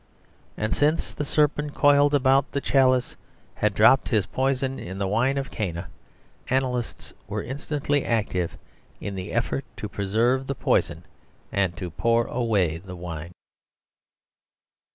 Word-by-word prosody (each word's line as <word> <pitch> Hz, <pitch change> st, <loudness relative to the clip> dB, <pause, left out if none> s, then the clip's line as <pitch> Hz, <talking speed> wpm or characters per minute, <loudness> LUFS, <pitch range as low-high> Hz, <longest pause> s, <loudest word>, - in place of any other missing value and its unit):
And 110 Hz, 0 st, -1 dB
since 150 Hz, +3 st, +1 dB
the -, -, -4 dB
serpent 150 Hz, 0 st, +1 dB
coiled 145 Hz, 0 st, +5 dB
about 135 Hz, 0 st, +3 dB
the 140 Hz, -, +1 dB
chalice 130 Hz, -2 st, +2 dB, 0.4 s
had 105 Hz, -1 st, 0 dB
dropped 130 Hz, +5 st, +5 dB
his 105 Hz, -5 st, +2 dB
poison 135 Hz, +3 st, -1 dB
in 95 Hz, -5 st, -7 dB
the 100 Hz, -, -1 dB
wine 125 Hz, +7 st, +1 dB
of 135 Hz, 0 st, -3 dB
Cana, 85 Hz, -5 st, -4 dB, 0.6 s
analysts 125 Hz, -2 st, -2 dB
were 105 Hz, +1 st, -3 dB
instantly 145 Hz, +1 st, -1 dB
active 100 Hz, -6 st, -1 dB, 0.4 s
in 100 Hz, -, -5 dB
the 95 Hz, +1 st, -5 dB
effort 120 Hz, +3 st, -1 dB
to 105 Hz, -, -4 dB
preserve 115 Hz, +7 st, 0 dB
the 140 Hz, -, -2 dB
poison -, -, 0 dB, 0.5 s
and 95 Hz, -2 st, 0 dB
to 90 Hz, -4 st, -5 dB
pour 115 Hz, +7 st, +2 dB
away 100 Hz, -10 st, 0 dB
the 95 Hz, +1 st, -9 dB
wine. 85 Hz, -1 st, -7 dB
120 Hz, 135 wpm, -25 LUFS, 100-135 Hz, 0.6 s, coiled